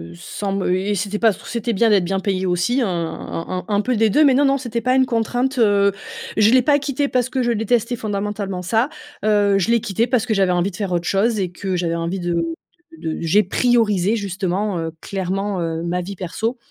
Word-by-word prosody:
sans 195 - -5
me 190 -2 0
et 200 +3 -1
c'était 200 +2 -2
pas 225 -2 +4
c - - -13
c'était 235 0 -2
bien 225 +3 +3
d'être 195 -4 +3
bien 195 +2 -1
payée 190 -1 -1
aussi, 180 +9 +1
un 230 - +1
un 165 -1 -4
un 180 - -5
un 205 -1 +1
peu 250 +3 0
des 220 0 +3
2, 300 +10 +4
mais 280 -3 +5
non, 285 +3 +3
non, 275 0 +3
c'était 240 -3 -3
pas 255 +2 +2
une 260 0 +4
contrainte, 245 +3 -1
heu, 200 -2 +4 0.5
je 215 0 +5
l'ai 255 +1 +6
pas 285 +3 +3
quitté 280 0 -1
parce 250 0 0
que 260 -3 -1
je 240 - +1
détestais 235 +2 0
fondamentalement 205 -3 -3
ça, 225 +8 +1 0.4
heu, 205 -2 +3
je 190 - 0
l'ai 235 -1 +3
quitté 220 +4 0
parce 250 -3 +1
que 220 - 0
j'avais 195 -3 +2
envie 175 +3 0
de - - -11
faire 200 -3 -3
autre 175 0 -1
chose 215 +3 +1
et 185 -3 -2
que 190 +1 -3
j'avais 170 -1 -1
envie 170 +3 -2
de 175 0 -1 0.6
de 160 - -4
de - - -7
j'ai 190 +6 +3
priorisé 215 -2 +2
justement, 195 -1 -2
heu, 165 0 -3
clairement, 195 0 -2
heu, 165 0 -2
ma 175 +1 -1
vie 195 +3 -6
perso. 220 +7 -3
205 Hz, 235 wpm, -20 LUFS, 185-235 Hz, 0.6 s, l'ai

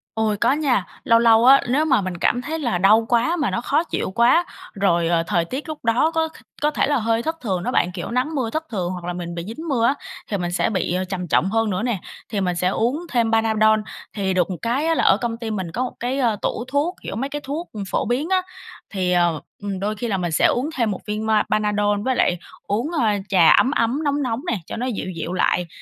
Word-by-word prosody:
Ôi, 220 -2 0
có - - +3
nha. 275 -10 +1 0.2
Lâu 230 0 +4
lâu 230 0 +5
á, 270 +2 +8
nếu 295 +5 +2
mà 275 - +3
mình 185 -2 -4
cảm 245 +7 +1
thấy 315 +4 -4
là 235 - 0
đau 215 +5 +5
quá 245 +8 +2
mà 295 - 0
nó 185 - -1
khó 295 +6 +1
chịu 260 - -3
quá, 245 - +4 0.3
rồi, 175 -4 +1
ờ, 165 -1 +2
thời 175 -2 0
tiết 265 - -5
lúc 300 -6 -7
đó 250 +8 +3
có 320 -1 +1
kh - - -21 0.3
có 300 - +2
thể 280 - +1
là 290 -2 +2
hơi 230 0 0
thất 320 +1 -2
thường 190 -6 -2
đó - - -1
bạn, 180 - +1
kiểu, 180 +5 -6
nắng 260 +6 -1
mưa 245 -5 -1
thất 315 +6 -2
thường 185 -4 -2
hoặc 180 -2 -6
là 180 - -3
mình 175 -1 -6
bị 170 - -4
dính 315 +9 -7
mưa 240 -5 +1
á, 275 - +3 0.3
thì 200 - -2
mình 175 -1 -3
sẽ 175 - +1
bị, 185 -4 -1
ờ, 185 - 0
trầm 180 -1 -4
trọng 185 +4 +2
hơn 225 0 +1
nữa 190 +1 -1
nè, 240 -6 -1 0.3
thì 205 -3 -2
mình 180 -2 0
sẽ 180 +1 0
uống 240 - 0
thêm 230 -3 +1
Panadol. 220 -1 +3 0.3
Thì 195 -2 -1
được 180 0 +1
một 180 - -4
cái 250 +7 0
á 330 - +2
là - - +1
ở 195 - +5
công 230 -1 -3
ty 230 -2 -5
mình 190 -5 -3
có 245 +8 -2
một 255 - -4
cái, 255 +3 -2
ơ, 235 -5 +2
tủ 235 - -2
thuốc, 290 +7 0
kiểu, - - -5
mấy 270 +6 -2
cái 295 0 -5
thuốc 305 +6 -4 0.2
phổ - - 0
biến 270 +8 -1
á, 375 -1 +3 0.5
thì, 185 -3 -1
ờ, 175 -3 +2 0.2
ừm, 195 -2 -3
đôi 210 +2 -2
khi 235 +3 -4
là 200 -4 0
mình 175 -2 -2
sẽ - - +3
uống 260 +5 +2
thêm 230 -5 +1
một 190 - -4
viên 210 +1 -2
ma 220 -1 +3
Panadol 210 -1 +1
với 260 +4 0
lại 180 - +2 0.3
uống, 225 - -2
ơ, 300 -9 +1 0.2
trà 180 -4 +5
ấm 260 - +5
ấm, 260 +2 0
nóng 290 -1 0
nóng 230 -2 -1
nè, 230 - 0
cho - - -6
nó 245 - -2
dịu 225 -6 -3
dịu 165 +2 -4
lại. 180 -1 +1
225 Hz, 265 wpm, -22 LUFS, 190-260 Hz, 0.5 s, á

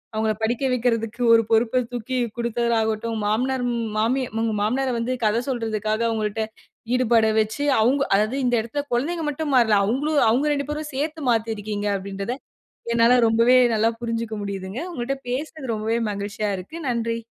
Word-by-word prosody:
அவுங்கள 220 0 +1
படிக்க 235 +4 0
வைக்குறதுக்கு 230 -2 -1
ஒரு 230 - +6
பொறுப்ப 230 +3 +3
தூக்கி 245 +2 -3 0.2
குடுக்கிறதாகட்டும், 230 -1 0
மாமனார், 250 +5 0
ம் 230 -2 -2
மாமி 240 +5 +1 0.2
உங்க 225 -1 0
மாமனார 255 +6 0
வந்து 245 +2 -1
கதை 215 +2 +2
சொல்றதுக்காக 220 -3 -1
அவுங்கள்ட்ட 220 -1 -1 0.5
ஈடுபட 235 -3 +3
வச்சி 220 +7 -1 0.2
அவுங்க 265 +5 +3
அதாவது 215 +6 +1
இந்த 245 -1 +2
இடத்துல் 285 +6 -5
குழந்தைங்க 315 +7 -1
மட்டும் 295 0 -3
மாறல. 225 -4 +5
அவுங்களும் 285 +7 +1
அவுங்க 260 +7 +2
2 280 -1 -2
பேரும் 300 0 -4
சேத்து 305 +4 -3
மாத்தி 225 -1 +1
இருக்கீங்க 205 0 -3
அப்பிடின்றத, 195 +4 -4 0.6
என்னால 235 +2 +5
ரொம்பவே 230 +3 +5 0.2
நல்லா 220 +1 +2
புரிஞ்சுக்க 230 -1 -3
முடியுதுங்க. 195 +2 -5
உங்கள்ட்ட 270 0 -3
பேசுனது 270 -1 -3
ரொம்பவே 220 +2 -1
மகிழ்ச்சியா 205 +1 -3
இருக்கு. 195 - -9
நன்றி. 230 -1 -1
230 Hz, 150 wpm, -23 LUFS, 220-255 Hz, 0.6 s, ஒரு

